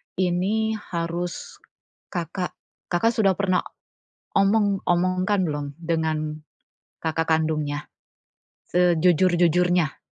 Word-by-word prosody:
ini 190 +5 +1
harus 170 -1 -4 0.5
Kakak 175 +1 -3 0.4
Kakak 225 +7 +2
sudah 200 -3 +4
pernah 185 -2 +2 0.7
omong, 200 0 +3
omongkan 185 +2 +1
belum 145 -1 -3
dengan 155 -2 -2 0.6
kakak 165 0 0
kandungnya? 155 -2 0 0.9
Sejujur-jujurnya. 175 -1 +3
175 Hz, 75 wpm, -24 LUFS, 160-185 Hz, 0.9 s, sudah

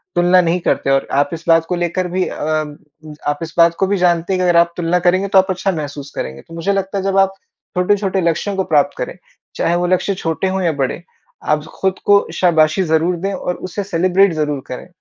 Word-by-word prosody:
तुलना 175 +1 +4
नहीं 175 +1 0
करते 140 -3 0
और 135 0 +2
आप 145 +1 +2
इस 165 0 -6
बात 165 -1 +4
को 180 - -2
लेकर 175 +1 -1
भी 180 +1 -1
अ, - - -6 0.9
आप 145 0 0
इस 165 0 -7
बात 170 0 +5
को 195 - +2
भी 200 +1 0
जानते 175 0 +1
हैं 185 - 0
कि - - +1
अगर 175 -1 +3
आप 170 0 +2
तुलना 175 +1 +1
करेंगे 185 +2 +2
तो 195 0 +2
आप 190 - +2
अच्छा 190 +1 0
महसूस 145 -4 -6
करेंगे। 65 +1 -5
तो - - -16
मुझे 165 +4 -1
लगता 195 0 -2
है 195 - -2
जब 195 0 0
आप 195 0 +3 0.4
छोटे-छोटे 195 +1 +1
लक्ष्यों 170 +4 -1
को 190 - 0
प्राप्त 155 -6 +1
करें, - - -5 0.4
चाहे 170 - +1
वो 175 0 0
लक्ष्य 185 +2 +1
छोटे 165 +1 -2
हों 190 0 -1
या 170 - +2
बड़े, 135 +6 -2 0.4
आप 150 0 0 0.2
खुद 190 -1 0
को 205 0 +4
शाबाशी 160 0 +3
ज़रूर 165 +1 +1
दें 195 +3 -3
और 180 - -3
उसे 185 +3 -5
सेलिब्रेट 185 0 +2
ज़रूर 150 -3 -2
करें। 125 - -7
175 Hz, 230 wpm, -17 LUFS, 165-190 Hz, 0.9 s, बात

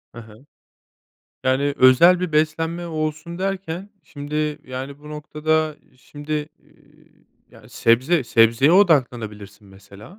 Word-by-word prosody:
Hı 120 - -8
hı. 110 +3 -17 1.0
Yani, 140 +2 +1
özel 170 +8 +6
bir 180 -3 -3
beslenme 160 +3 -1
olsun 155 +1 -4
derken, 190 -1 -4
şimdi, 150 +1 -4
yani, 130 +2 -7
bu 150 +1 -13
noktada, 155 +1 -2 0.2
şimdi, 150 +3 -6
iii, - - -27 0.2
yani, - - -18
sebze 130 +7 +1
sebzeye 115 +6 +3
odaklanabilirsin, 115 - +1
mesela, 100 - -15
150 Hz, 110 wpm, -21 LUFS, 125-160 Hz, 1.0 s, özel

